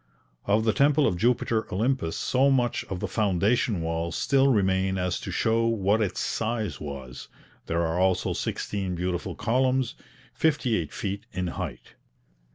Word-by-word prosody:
Of 105 +2 +2
the 110 - +3
temple 145 +1 +4
of - - +2
Jupiter 115 +2 +1
Olympus 110 -3 0
so 135 +2 +2
much 125 -3 +1
of 95 - -5
the - - -1
foundation 105 0 +1
walls 85 +1 -2
still 135 -1 +3
remain 95 -5 +2
as 90 -1 -1
to - - -7
show 115 +1 +1
what 110 -1 +2
its 95 -4 -1
size 110 -3 -2
was; 70 -4 -7 0.4
there 85 +1 0
are 80 +2 -1
also 95 -1 +2
sixteen 95 -3 -3
beautiful 90 0 -3
columns, 130 +2 +1 0.4
fifty 140 -7 +1
eight 80 -7 -2
feet 100 +2 -4
in 90 - -2
height. - - -6
105 Hz, 155 wpm, -26 LUFS, 90-120 Hz, 0.4 s, temple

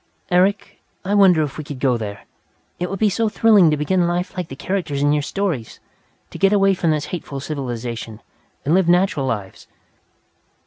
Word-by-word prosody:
"Eric, 190 +3 +1 0.2
I 200 - -1
wonder 190 -6 +5
if 145 0 -6
we - - -4
could 145 -3 -8
go 130 -2 +2
there! 105 -3 -6 0.5
It 180 0 -2
would 195 - -4
be 215 - +2
so 225 +2 0
thrilling 210 -6 +5
to 150 - +1
begin 175 +4 +1
life 175 +2 -2
like 180 -3 -4
the 135 - -8
characters 155 -4 -2
in 145 0 +3
your 150 - +1
stories, 155 - -3 0.5
to - - -9
get 195 0 +4
away 195 -1 +4
from 175 -3 -1
this 150 -2 0
hateful 150 -5 -5
civilization, 120 -6 -5 0.5
and 150 - +2
live 185 -1 +3
natural 175 -6 +2
lives. 100 -6 -5
165 Hz, 185 wpm, -20 LUFS, 140-190 Hz, 0.5 s, wonder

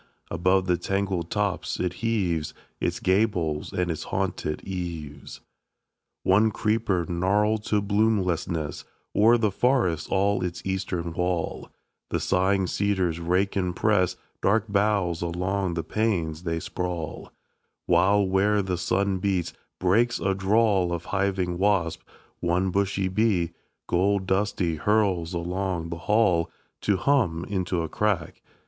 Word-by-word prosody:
Above 90 +3 +2
the 90 -1 +2
tangled 95 -2 -2
tops 105 -3 -1
it 90 -1 -1
heaves 95 -9 0 0.2
Its - - -1
gables 95 -6 +1
and 90 -1 -1
its 80 - -5
haunted 75 0 -2
eaves. 85 -6 -6 0.8
2. - - -2
One 105 +3 +5
creeper, 105 -4 0
gnarled 105 +5 +1
to 105 -1 +1
bloomlessness, 95 -7 0 0.3
O'er 115 +3 +6
forests 95 - +1
all 100 0 +1
its 90 -1 -4
eastern 90 -3 -2
wall; 90 -1 -2 0.4
The - - -1
sighing 95 +1 +2
cedars 95 -3 0
rake 90 +4 0
and 90 -2 -1
press 90 -3 +2 0.3
Dark 105 +2 +2
boughs 100 -4 +1
along 90 +1 -1
the 85 - -2
panes 85 -5 -1
they 80 -1 -1
sprawl; 85 -2 -5 0.5
While, 100 +1 +4
where 100 +2 +2
the 90 -2 -2
sun 95 +1 0
beats, 95 -3 -1 0.2
breaks 110 +7 +2
a 95 - +1
drawl 95 -2 +2
Of 85 -1 -3
hiving 95 -3 0
wasps; 95 -5 +1 0.4
one 90 +2 +1
bushy 100 0 0
bee, 95 -4 +1 0.3
Gold 95 +2 +1
dusty, 95 -4 0
hurls 95 -2 +1
along 90 -1 -2
the 85 - -4
hall 100 -7 +3 0.3
To 100 -2 +2
hum 95 -11 +1
into 90 -3 -1
a - - -3
crack. 100 -4 -1
95 Hz, 130 wpm, -26 LUFS, 85-100 Hz, 0.8 s, O'er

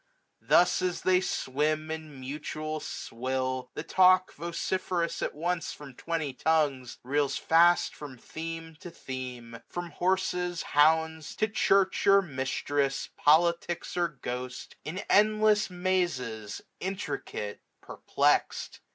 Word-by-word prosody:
Thus 180 +1 +4
as 180 -1 -1
they 185 0 +4
swim 155 0 -1
in 155 -3 -7
mutual 155 +3 -5
swill, 130 0 -3
the - - -4
talk. 185 0 +4
Vociferous 170 +1 -2
at - - -2
once 170 +1 -2
from 145 -3 -11
twenty 160 0 -3
tongues, 140 -4 0
539 130 +3 -8
Reels 145 -1 +2
fast 170 +2 +4
from 145 -4 -9
theme 165 +4 -7
to 175 - -9
theme; 125 -6 -7
from 175 -1 -6
horses, 180 0 0
hounds. 160 +1 +2
To 215 - +1
church 195 -2 +2
or 200 0 +7
mistress, 135 -1 -1
politics 170 +2 +2
or 175 -1 +2
ghost. 125 -4 -6
In 180 +6 -5
endless 215 0 +4
mazes, 175 - -2 0.2
intricate, 180 - -4 0.2
perplexed. - - 0
160 Hz, 115 wpm, -29 LUFS, 135-180 Hz, 0.2 s, or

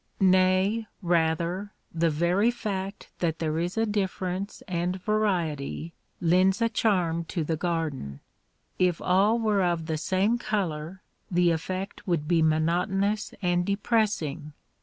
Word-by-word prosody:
Nay, 190 +3 +3 0.2
rather, 170 +4 0 0.2
the 165 0 +2
very 175 +8 +2
fact 200 -4 -4
that 165 -2 0
there 160 -1 -1
is 175 +2 -2
difference 200 -3 -2
and 180 0 -1
variety 170 -7 -1 0.3
lends 185 +4 +3
a 230 0 +2
charm 180 -7 +1
to 165 0 -2
the 160 +2 -1
garden. 155 - -3 0.6
If 180 -2 +2
all 195 +5 +3
were 215 -4 +2
of 170 -2 0
the 160 -1 -2
same 190 +9 +1
color 185 -6 -3 0.3
the 175 -1 +3
effect 185 +5 -4
would 165 -4 0
be 170 -1 +3
monotonous 180 +7 +1
and 175 0 +2
depressing. 200 - 0
180 Hz, 125 wpm, -27 LUFS, 165-200 Hz, 0.6 s, Nay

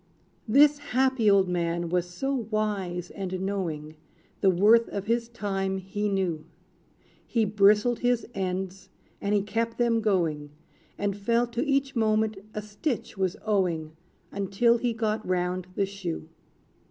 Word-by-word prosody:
This 285 +5 +5
happy 260 -5 +2
old 195 -2 +5
man 170 -1 -1
was 180 0 0
so 260 +5 -2
wise 195 -5 -2
and 185 -2 -4
knowing, 165 -6 -3 0.4
The 195 - +4
worth 210 +6 +5
of 200 -1 -4
his 230 +1 0
time 195 -4 -2
he 205 +2 -3
knew. 185 -6 -1 0.8
He 230 -3 +1
bristled 210 +3 +4
his 245 -1 +1
ends, 190 -1 -3 0.3
and 200 +1 +1
he 200 - +2
kept 230 +2 -2
them 235 -2 +2
going; 165 -8 0 0.5
And 200 -1 -1
felt 235 +4 0
to 235 - 0
each 275 -1 +1
moment 220 -1 +2 0.2
a 210 - -3
stitch 215 +5 -3
was 190 -2 -1
owing, 170 -7 0 0.4
Until 200 +4 +2
he 245 0 0
got 220 -1 -1
round 180 0 -1
the 200 - +2
shoe. 190 -5 -5
200 Hz, 140 wpm, -27 LUFS, 185-230 Hz, 0.8 s, This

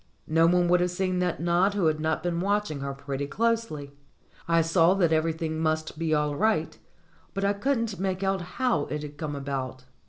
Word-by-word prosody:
No 165 +1 +4
one 175 0 +3
would 180 +1 +4
have 180 0 +1
seen 185 0 -1
that 180 -1 0
nod 175 +4 +2
who 195 -4 +1
had 155 -1 +2
not 160 0 -1
been 175 -1 -1
watching 200 -5 0
her 140 0 -3
pretty 140 0 -4
closely. 225 -9 -1 0.6
I 165 -1 +4
saw 165 +2 +4
that 170 -4 +2
every 160 +1 +2
thing 160 0 -3
must 155 -1 -1
be 165 -1 -1
all 150 -1 +1
right, 220 +6 +1 0.6
but 195 0 0
I 200 - +3
couldn't 230 -3 -1
make 190 0 -1
out 195 -1 +1 0.2
how 245 - +1
it 150 0 -4
had 145 0 -8
come 150 -2 -3
about. 135 -2 -4
165 Hz, 200 wpm, -27 LUFS, 150-190 Hz, 0.6 s, No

